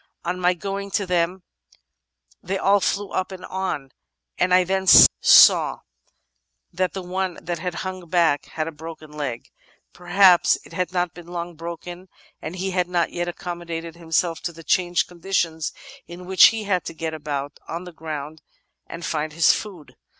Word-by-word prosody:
On 180 +1 -2
my 180 0 +2
going 200 +3 -5
to 200 0 -1
them 180 +1 -1 1.0
they 195 +2 -3
aU 200 +1 +3
flew 200 +1 -1
up 185 +1 -2
and 185 -1 -8
on, 185 -8 -4 0.5
and 180 - +2
I 180 0 +5
then 190 +1 -2
saw - - +7 0.9
that 185 -1 -1
the 190 - -5
one 185 0 -3
that 175 -1 -5
had 180 +1 -4
hung 185 -2 -6
back 165 -4 +2
had 155 0 -4
a - - -4
broken 155 0 -10
leg. 140 -6 -5 0.4
Perhaps 180 0 +4
it - - -15
had 180 0 -2
not 180 -2 -1
been 175 -1 -13
long 175 0 -5
broken, 170 +3 -8 0.3
and 160 +3 -6
he 190 +1 -3
had 180 -1 0
not 175 -2 0
yet 175 0 -3
accom 175 0 -6
modated 165 -1 -6
himself 165 0 -1
to 175 - -3
the 165 0 -13
changed 175 +1 +1
conditions 170 -3 -2 0.4
in 175 +1 -10
which 190 0 +7
he 225 -1 -2
had 185 -4 0
to - - -7
get 160 0 -4
about 145 -2 -5
on 170 +2 -5
the 180 -1 -11
groimd 155 -1 -7 0.5
and 170 0 -7
find 155 -1 -2
his 165 +1 +5
food. 165 -11 -8
175 Hz, 175 wpm, -23 LUFS, 165-185 Hz, 1.0 s, saw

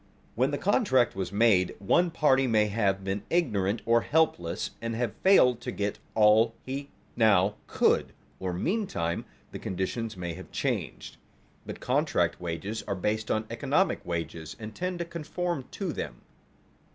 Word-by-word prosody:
When 130 +4 +2
the 145 - -1
contract 160 - +2
was 95 -2 -3
made, 100 -3 +3
one 175 - +2
party 135 -5 +3
may 110 -3 +3
have 100 -2 0
been 95 +1 -2
ignorant 110 - +1
or 115 0 +4
helpless, 150 - 0
and 115 0 -3
have 115 -2 -1
failed 125 -11 +5
to - - -4
get 100 0 -3 0.2
all 110 +1 +5
he 140 +2 -5 0.3
now 105 -3 +4
could; - - +2 0.3
or 95 -1 -2
meantime 90 - -1 0.3
the - - -7
conditions 105 +4 -3
may 85 -2 -4
have 95 +3 -10
changed. - - -3 0.5
But - - -7
contract - - +1
wages 90 +6 -4
are 100 - -1
based 105 +4 -1
on 110 0 0
economic - - +1
wages 80 -2 -4
and 110 -2 -8
tend 180 +7 -3
to 170 - -3
conform 170 -2 -3
to 190 -6 -3
them. - - -5
110 Hz, 150 wpm, -28 LUFS, 95-135 Hz, 0.5 s, failed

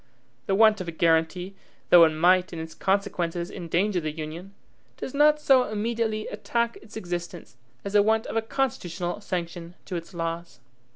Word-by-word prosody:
The 195 - +2
want 215 -1 +5
of 180 - -6
a - - -3
guaranty, 165 +3 +1 0.4
though 170 -1 +9
it - - +3
might 180 +4 +3
in 170 - -7
its 160 0 -6
consequences 180 -3 -1
endanger 180 +3 -1
the 155 - -2
Union, 165 +5 -7 0.4
does 260 - -6
not 300 +1 +4
so 265 -4 +4
immediately 220 0 -2
attack 235 0 -1
its 215 +1 -12
existence 175 - -6 0.3
as 200 - -4
the 205 - +6
want 220 +2 +2
of - - -6
a 225 - +2
constitutional 205 -7 -3
sanction 175 -2 -5
to 185 - -5
its 170 +1 -6
laws. 165 -5 -4
180 Hz, 170 wpm, -26 LUFS, 170-215 Hz, 0.4 s, though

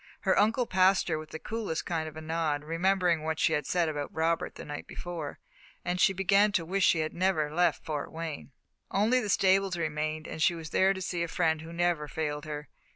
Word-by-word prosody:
Her 190 - +2
uncle 225 +5 +3
passed 190 -2 +3
her 155 -2 0
with 155 0 -9
the - - -6
coolest 210 -3 -3
kind 160 -2 -2
of 155 - -13
a - - -6
nod, 155 -2 -1
remembering 175 +1 +1
what 160 0 -2
she 160 - +2
had 150 -2 -1
said 175 -2 +1
about 145 -2 -3
Robert 165 +1 0
the - - -8
night 145 0 -6
before, 170 -5 -6 0.5
and 180 +1 -1
she 195 - +6
began 195 +2 +3
to 170 -5 +1
wish 190 +3 0
she 165 - +4
had 155 - -3
never 170 -5 +1
left 175 -3 +1
Fort 150 -3 -3
Wayne. 160 -3 -6 0.4
Only 220 +6 +3
the 215 -4 -3
stables 195 -1 +3
remained, 155 -1 -2
and 160 - -6
she 175 +2 +4
went 160 -2 -8
there 190 +1 +4
to 190 - -5
see 175 -1 -2
the 170 - 0
friend 160 -2 +1
who 160 +1 -9
never 170 -3 0
failed 150 0 -3
her. 150 -1 -6
165 Hz, 220 wpm, -29 LUFS, 155-185 Hz, 0.5 s, she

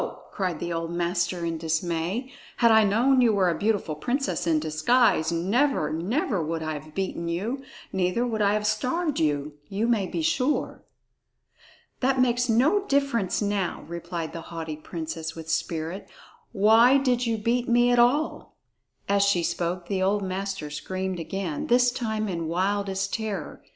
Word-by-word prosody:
cried 180 -5 -2
the 175 0 -3
old 165 0 -3
master 175 0 -1
in 165 -1 -2
dismay. 170 - -2 0.3
"Had 235 -2 +5
I 220 0 +6
known 245 +6 +3
you 235 -2 +5
were 190 -3 +3
a - - -2
beautiful 205 -6 0
princess 245 - -2
in 160 -2 +3
disguise, 160 +3 +2
never, 185 - +1
never 195 - -1
would 160 +1 -3
I 155 0 -2
have 150 +1 -9
beaten 190 -3 -3
you; 210 +11 -2 0.3
neither 190 +5 +1
would 225 -3 -2
I 205 0 +3
have 210 0 -1
starved 260 +9 0
you, 150 -1 -1
you 205 +3 -1
may 220 -5 +1
be 325 - -3
sure." 300 -3 0 1.2
"That 265 0 +1
makes 245 -1 +2
no 295 - +3
difference 275 -9 +1
now," 200 -3 -1
replied 170 -1 -5
the 165 - -6
haughty 160 -2 -5
princess 160 0 -6
with 160 -1 -6
spirit; 165 +3 -3 0.4
"why 225 +5 +6
did 250 -3 +1
you 225 -1 0
beat 235 +3 0
me 240 +1 +4
at 245 - +3
all?" 270 +6 +1 0.5
As 200 0 +3
she 200 -4 +3
spoke, 175 +1 -2
the 195 -2 -1
old 200 +2 +1
master 190 -4 -4
screamed 185 +4 -4
again, 170 -1 -4
this 245 0 +4
time 220 -3 -2
in 170 -4 -3
wildest 195 +3 -1
terror. 205 -8 -4
195 Hz, 160 wpm, -26 LUFS, 170-240 Hz, 1.2 s, I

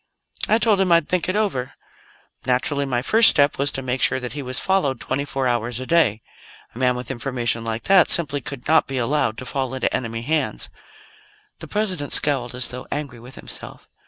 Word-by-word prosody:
"I 220 - +4
told 215 -4 +2
him 185 -2 +1
I'd 170 -3 +4
think 180 0 0
it 185 - -1
over. 185 -13 -1 0.7
Naturally, 140 +3 0
my 125 -2 -1
first 225 - +6
step 145 -2 +2
was 140 +1 +1
to 135 - -3
make 130 0 -3
sure - - +2
that 125 -1 -6
he 145 - -5
was 130 -1 -4
followed 150 -10 0
twenty 140 +4 -3
four 135 -2 -2
hours 120 0 -1
a 130 - -5
day. 125 -10 +2 0.5
A 120 - -10
man 125 -1 +2
with 125 +2 -6
information 120 -3 -3
like 115 0 -4
that 190 -3 +5
simply 145 -4 +5
could 130 0 -7
not 160 +1 +3
be 135 - -4
allowed 125 -2 0
to 130 - -7
fall 130 -1 -3
into 130 - -1
enemy 115 -1 -4
hands." 155 +4 -1 0.9
The - - -8
President 185 -9 -2
scowled, 130 -5 +3
as 125 -1 -2
though 125 0 -8
angry 145 -5 -5
with 125 +3 -13
himself. - - -9
135 Hz, 205 wpm, -21 LUFS, 125-155 Hz, 0.9 s, first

